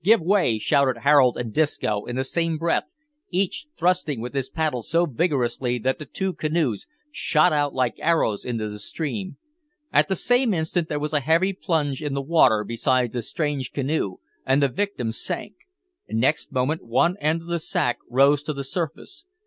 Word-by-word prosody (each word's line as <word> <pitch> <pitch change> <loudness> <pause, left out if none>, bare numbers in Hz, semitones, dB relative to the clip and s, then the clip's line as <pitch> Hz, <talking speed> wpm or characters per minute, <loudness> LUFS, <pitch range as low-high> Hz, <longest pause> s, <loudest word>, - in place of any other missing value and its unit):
give 225 +5 +5
way!" 175 - +2
shouted 130 +3 +2
Harold 140 -4 +5
and 115 -3 -4
Disco 110 -9 0
in 120 - -5
the 130 - 0
same 165 +3 -1
breath, 165 +2 0 0.4
each 190 - -1
thrusting 175 -7 +1
with 120 +3 -6
his 135 -2 -2
paddle 155 -6 -1
so 165 +8 +1
vigorously 125 -5 0
that 130 +3 -1
the 150 - -8
two 190 -1 -2
canoes 155 -10 -1 0.2
shot 155 - +2
out 145 -1 0
like 125 -3 0
arrows 160 -11 +1
into 115 -3 -3
the 105 0 -7
stream. 175 - -4 0.6
At - - +4
the 190 - 0
same 245 +1 +2
instant 160 +1 -1
there 150 - -1
was 150 +1 -3
a 150 - +3
heavy 165 +7 +2
plunge 155 -7 -1
in 145 -2 -3
the 140 - -1
water 130 -8 +4
beside 120 +2 0
the 120 - -3
strange 145 0 -3
canoe, 135 -9 -1 0.3
and 135 +2 +2
the 140 - +3
victim 180 - -2
sank. 115 - -4 0.6
Next 125 +8 0
moment 130 +5 -1
one 145 +10 +2
end 160 +2 +1
of - - -14
the 170 0 0
sack 120 -5 -1
rose 140 +3 +4
to 150 +1 -4
the 140 -1 -5
surface. 165 - -5
145 Hz, 180 wpm, -24 LUFS, 125-165 Hz, 0.6 s, give